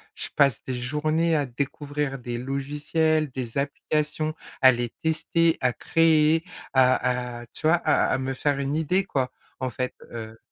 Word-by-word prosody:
je -, -, -4 dB
passe 140 Hz, -2 st, +3 dB
des 130 Hz, -, -3 dB
journées 155 Hz, +6 st, 0 dB
à 145 Hz, -, +1 dB
découvrir 140 Hz, +2 st, -3 dB
des 120 Hz, -1 st, -4 dB
logiciels, 150 Hz, +4 st, 0 dB
des 125 Hz, -2 st, -5 dB
applications, 150 Hz, +2 st, -1 dB, 0.3 s
à 130 Hz, 0 st, +9 dB
les 120 Hz, 0 st, -2 dB
tester, 165 Hz, +1 st, +2 dB
à 125 Hz, -1 st, +3 dB
créer, 160 Hz, +1 st, +3 dB, 0.3 s
à 125 Hz, -2 st, +2 dB
à -, -, -10 dB
tu 155 Hz, -, -3 dB
vois, 160 Hz, -, +6 dB
à -, -, +2 dB
à -, -, +1 dB
me 130 Hz, 0 st, -2 dB
faire 140 Hz, +1 st, 0 dB
une 140 Hz, +1 st, -1 dB
idée, 180 Hz, +5 st, +1 dB
quoi, 130 Hz, -8 st, -1 dB, 0.3 s
en 130 Hz, 0 st, -1 dB
fait, 125 Hz, +2 st, -3 dB, 0.2 s
heu 110 Hz, -1 st, -7 dB
140 Hz, 165 wpm, -25 LUFS, 125-155 Hz, 0.3 s, à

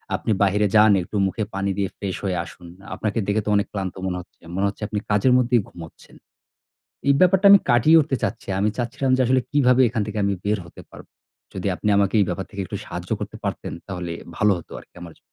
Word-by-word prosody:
"আপনি 110 Hz, -, -2 dB
বাহিরে 105 Hz, +1 st, +2 dB
যান, 105 Hz, 0 st, +7 dB
একটু 105 Hz, -, -10 dB
মুখে 110 Hz, +3 st, -3 dB
পানি 100 Hz, 0 st, -1 dB
দিয়ে 100 Hz, -1 st, -1 dB
ফ্রেশ 95 Hz, -3 st, -4 dB
হয়ে 90 Hz, -2 st, -1 dB
আসুন। 90 Hz, 0 st, -13 dB, 0.3 s
আপনাকে 110 Hz, +2 st, -2 dB
দেখে 105 Hz, +1 st, +1 dB
তো -, -, -2 dB
অনেক 100 Hz, -, +1 dB
ক্লান্ত 95 Hz, -3 st, -4 dB
মনে 90 Hz, -1 st, -2 dB
হচ্ছে। 90 Hz, -, -22 dB
মনে 95 Hz, -, +1 dB
হচ্ছে 100 Hz, -, -6 dB
আপনি 105 Hz, -1 st, -3 dB
কাজের 105 Hz, +5 st, +3 dB
মধ্যেই 120 Hz, -2 st, +2 dB
ঘুমোচ্ছেন।" 80 Hz, -2 st, -13 dB, 0.9 s
এই 140 Hz, -, +6 dB
ব্যাপারটা 190 Hz, +2 st, +4 dB
আমি 200 Hz, -1 st, +9 dB
কাটিয়ে 150 Hz, +8 st, +6 dB
উঠতে 140 Hz, -3 st, -1 dB
চাচ্ছি। 110 Hz, +1 st, -3 dB
আমি 105 Hz, -, +2 dB
চাচ্ছিলাম 130 Hz, +2 st, -1 dB
যে -, -, -2 dB
আসলে 130 Hz, +1 st, +3 dB
কীভাবে 130 Hz, -3 st, +3 dB
এখান 110 Hz, -2 st, -2 dB
থেকে 105 Hz, 0 st, -5 dB
আমি 100 Hz, 0 st, +1 dB
বের 105 Hz, +1 st, +1 dB
হতে -, -, -13 dB
পারব। -, -, -13 dB, 0.5 s
যদি -, -, -4 dB
আপনি 105 Hz, -, -3 dB
আমাকে 100 Hz, +1 st, +1 dB
এই 100 Hz, -, +4 dB
ব্যাপার 95 Hz, +2 st, -3 dB
থেকে 100 Hz, -, -6 dB
একটু -, -, -5 dB
সাহায্য -, -, -7 dB
করতে -, -, -6 dB
পারতেন, -, -, -4 dB
তাহলে 90 Hz, -3 st, -5 dB, 0.2 s
ভালো 105 Hz, -1 st, +3 dB
হতো -, -, -13 dB
আরকি -, -, -21 dB
আমার 85 Hz, -, -9 dB
জন্য। -, -, -27 dB
105 Hz, 220 wpm, -22 LUFS, 95-120 Hz, 0.9 s, আমি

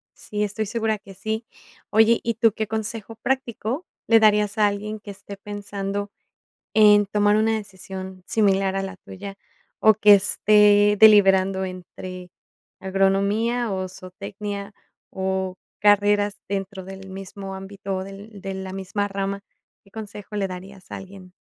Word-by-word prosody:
Sí, 210 Hz, 0 st, -4 dB
estoy 210 Hz, +1 st, -2 dB
segura 220 Hz, 0 st, -1 dB
que 200 Hz, -1 st, -14 dB
sí. 220 Hz, +4 st, -4 dB, 0.4 s
Oye, 220 Hz, +2 st, +5 dB
¿y 230 Hz, -1 st, -1 dB
tú 225 Hz, -1 st, +4 dB
qué 220 Hz, 0 st, -3 dB
consejo 220 Hz, 0 st, -4 dB
práctico 255 Hz, -, -2 dB, 0.2 s
le 225 Hz, -1 st, +6 dB
darías 210 Hz, -1 st, +3 dB
a 210 Hz, -1 st, +5 dB
alguien 210 Hz, +1 st, -4 dB
que 205 Hz, -1 st, -9 dB
esté 200 Hz, 0 st, -10 dB
pensando 200 Hz, 0 st, -5 dB, 0.6 s
en 210 Hz, -1 st, +7 dB
tomar 205 Hz, +1 st, +3 dB
una 220 Hz, +1 st, +2 dB
decisión 190 Hz, -2 st, -8 dB
similar 195 Hz, -3 st, +2 dB
a 195 Hz, -, 0 dB
la 195 Hz, 0 st, -6 dB
tuya, 195 Hz, +1 st, -9 dB, 0.4 s
o, 220 Hz, -, +6 dB
que 210 Hz, 0 st, +7 dB
esté 205 Hz, +1 st, +5 dB
deliberando 195 Hz, -3 st, +6 dB
entre 185 Hz, 0 st, -8 dB, 0.5 s
agronomía, 200 Hz, +5 st, +1 dB
o, 185 Hz, -1 st, -2 dB
zootecnia, 200 Hz, +2 st, -7 dB, 0.4 s
o, 190 Hz, -1 st, -2 dB, 0.2 s
carreras 205 Hz, 0 st, +3 dB
dentro 195 Hz, -1 st, -4 dB
del 190 Hz, 0 st, -10 dB
mismo 195 Hz, 0 st, -7 dB
ámbito, 195 Hz, 0 st, -5 dB
o, 185 Hz, -, -3 dB
del 200 Hz, +2 st, -11 dB
de 195 Hz, 0 st, -5 dB
la 190 Hz, 0 st, -6 dB
misma 195 Hz, +2 st, -2 dB
rama? 195 Hz, 0 st, -3 dB, 0.4 s
¿Qué 195 Hz, -, -22 dB
consejo 210 Hz, -1 st, -8 dB
le 200 Hz, -, 0 dB
darías 185 Hz, +1 st, -10 dB
a -, -, -5 dB
alguien? 190 Hz, -1 st, -12 dB
200 Hz, 145 wpm, -23 LUFS, 195-210 Hz, 0.6 s, en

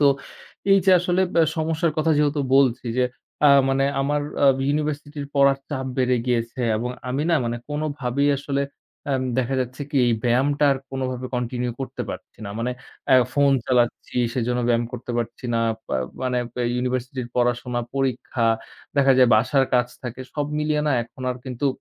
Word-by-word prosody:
তো 145 Hz, -, +5 dB, 0.7 s
এই 195 Hz, -, +7 dB
যে 190 Hz, -, +5 dB
আসলে 180 Hz, +1 st, +1 dB
ব -, -, -4 dB, 0.2 s
সমস্যার 160 Hz, +1 st, 0 dB
কথা 160 Hz, +1 st, +2 dB
যেহেতু 145 Hz, 0 st, +2 dB, 0.2 s
বলছি 130 Hz, -3 st, +3 dB
যে 125 Hz, -, +4 dB, 0.4 s
আ -, -, +7 dB, 0.2 s
মানে 135 Hz, 0 st, +2 dB, 0.2 s
আমার 145 Hz, +2 st, +1 dB, 0.2 s
আ -, -, +7 dB, 0.2 s
ইউনিভার্সিটির 145 Hz, -1 st, -2 dB
পড়ার 140 Hz, -1 st, +5 dB
চাপ 130 Hz, -3 st, -3 dB
বেড়ে 125 Hz, -1 st, +2 dB
গিয়েছে 120 Hz, 0 st, -1 dB, 0.2 s
এবং 120 Hz, +3 st, -2 dB, 0.2 s
আমি 135 Hz, +4 st, -1 dB
না -, -, +4 dB
মানে 120 Hz, 0 st, -2 dB
কোনভাবেই 145 Hz, -2 st, -1 dB
আসলে 140 Hz, 0 st, -1 dB, 0.5 s
আম 130 Hz, -1 st, +1 dB, 0.2 s
দেখা 130 Hz, +1 st, 0 dB
যাচ্ছে 130 Hz, +2 st, -5 dB
কি 145 Hz, -, -2 dB
এই 120 Hz, -, +3 dB
ব্যায়ামটা 140 Hz, +5 st, +2 dB
আর 135 Hz, -, -2 dB
কোনভাবে 130 Hz, -1 st, -3 dB
কন্টিনিউ 125 Hz, 0 st, -2 dB
করতে 135 Hz, -, -4 dB
পারছি -, -, -9 dB
না। 100 Hz, -, -5 dB
মানে 120 Hz, +2 st, -1 dB, 0.4 s
এ -, -, +8 dB, 0.2 s
ফোন 140 Hz, -1 st, +4 dB
চালাচ্ছি, 125 Hz, -1 st, 0 dB, 0.2 s
সেজন্য 125 Hz, 0 st, 0 dB
ব্যায়াম 120 Hz, 0 st, +2 dB
করতে 125 Hz, 0 st, -6 dB
পারছি 120 Hz, +2 st, -5 dB
না। 115 Hz, -, +2 dB, 0.3 s
আ -, -, +2 dB, 0.3 s
মানে 125 Hz, -1 st, 0 dB, 0.4 s
ইউনিভার্সিটির 125 Hz, 0 st, -2 dB
পড়াশোনা, 120 Hz, 0 st, 0 dB
পরীক্ষা। 130 Hz, -3 st, 0 dB, 0.5 s
দেখা 135 Hz, -1 st, +5 dB
যায় 125 Hz, -2 st, +6 dB
বাসার 130 Hz, +5 st, +3 dB
কাজ 120 Hz, 0 st, +4 dB, 0.2 s
থাকে, 125 Hz, +1 st, -6 dB
সব 145 Hz, -1 st, -1 dB
মিলিয়ে 150 Hz, 0 st, 0 dB
না 145 Hz, -, +2 dB
এখন 120 Hz, +3 st, -12 dB
আর 125 Hz, -, -3 dB
কিন্তু 130 Hz, +1 st, -2 dB
130 Hz, 170 wpm, -23 LUFS, 125-145 Hz, 0.7 s, এ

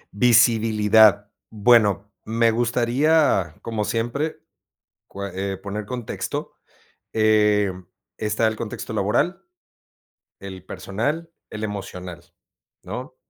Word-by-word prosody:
Visibilidad. 110 Hz, -2 st, +4 dB, 0.2 s
bueno, 105 Hz, -2 st, +3 dB
me 115 Hz, +1 st, +2 dB
gustaría, 120 Hz, -, +2 dB
como 110 Hz, -2 st, -2 dB
siempre, 120 Hz, +9 st, -2 dB, 0.7 s
cue 100 Hz, 0 st, -6 dB, 0.2 s
eh, -, -, -6 dB
poner 100 Hz, +2 st, -6 dB
contexto. 125 Hz, -2 st, -5 dB, 0.6 s
Eh, 105 Hz, -2 st, +3 dB, 0.5 s
está 110 Hz, +1 st, 0 dB
el 110 Hz, -, -1 dB
contexto 110 Hz, 0 st, -6 dB
laboral, 110 Hz, -, 0 dB, 1.0 s
el 95 Hz, -2 st, -9 dB
personal, 115 Hz, -, -3 dB, 0.2 s
el 110 Hz, 0 st, -4 dB
emocional, 90 Hz, -4 st, -8 dB, 0.5 s
¿no?, 125 Hz, +2 st, -7 dB
110 Hz, 90 wpm, -23 LUFS, 100-120 Hz, 1.0 s, Visibilidad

